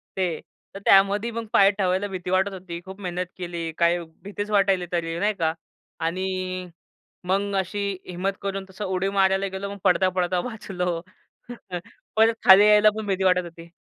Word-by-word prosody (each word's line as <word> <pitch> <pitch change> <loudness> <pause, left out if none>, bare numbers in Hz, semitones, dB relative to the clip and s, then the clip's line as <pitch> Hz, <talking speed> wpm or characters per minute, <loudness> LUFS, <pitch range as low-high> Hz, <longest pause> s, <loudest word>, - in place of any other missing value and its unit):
ते. 180 -4 -1 0.3
तर 195 - -7
त्यामध्ये 200 +4 +4
मग 230 0 -4
पाय 195 0 +6
ठेवायला 195 0 0
भीती 185 -2 -6
वाटत 190 +2 +2
होती. 180 -2 -7
खूप 190 +1 -10
मेहनत 180 -1 -3
केली, 170 -2 -4
काही 170 +1 +3 0.2
भीतीच 205 +1 -5
वाटायली 195 -3 +3
तरी, 165 -1 -2
नाही 210 +3 +1
का. 160 -5 0 0.5
आणि 185 +1 -3 0.6
मग 200 +2 0
अशी 190 +2 -3 0.3
हिम्मत 185 +2 -2
करून 195 -1 -3
तसं 190 +2 -6
उडी 190 0 -1
मारायला 195 0 +3
गेलो, 200 +1 -5
मग 200 - -8
पडता-पडता 180 0 +2
वाचलो. 180 -6 -3 1.2
परत 225 +1 +5
खाली 195 +2 +9
यायला 210 0 +6
पण 220 -1 -4
भीती 190 -1 0
वाटत 180 -1 +4
होती. 170 0 -11
190 Hz, 160 wpm, -24 LUFS, 180-200 Hz, 1.2 s, खाली